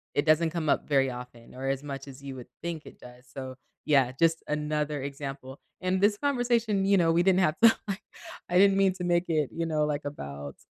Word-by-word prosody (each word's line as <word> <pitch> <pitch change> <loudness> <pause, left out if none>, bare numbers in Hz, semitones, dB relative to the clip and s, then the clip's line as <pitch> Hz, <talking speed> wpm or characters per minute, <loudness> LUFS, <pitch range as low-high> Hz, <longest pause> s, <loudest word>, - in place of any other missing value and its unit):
it 145 +1 +2
doesn't 160 +1 +4
come 165 -3 -3
up - - +1
very 135 -2 +3
often 125 -1 -10
or 135 +1 -4
as 135 +1 -2
much 135 -1 -6
as 135 0 -11
you 135 -1 -7
would 125 - -9
think 165 -2 -5
it - - -13
does, 125 +1 -14
so, 130 0 -7 0.3
yeah, 135 -4 +3
just 165 +4 +1
another 150 -1 -1
example. 135 -1 -6 0.2
In 185 0 0
this 205 0 +4
conversation, 240 -7 +1
you 200 0 +4
know, 165 -2 +3
we 175 +1 +3
didn't 190 0 +4
have 155 -2 +2
to, 230 0 +6
like 195 0 -3 0.5
I 180 - +2
didn't 195 0 +6
mean 195 -1 +4
to 180 - -6
make 175 0 +2
it, 155 -4 +1
you 165 0 -2
know, 155 -2 +1
like, 150 0 -2
about, 70 - -7
150 Hz, 225 wpm, -28 LUFS, 135-180 Hz, 0.5 s, to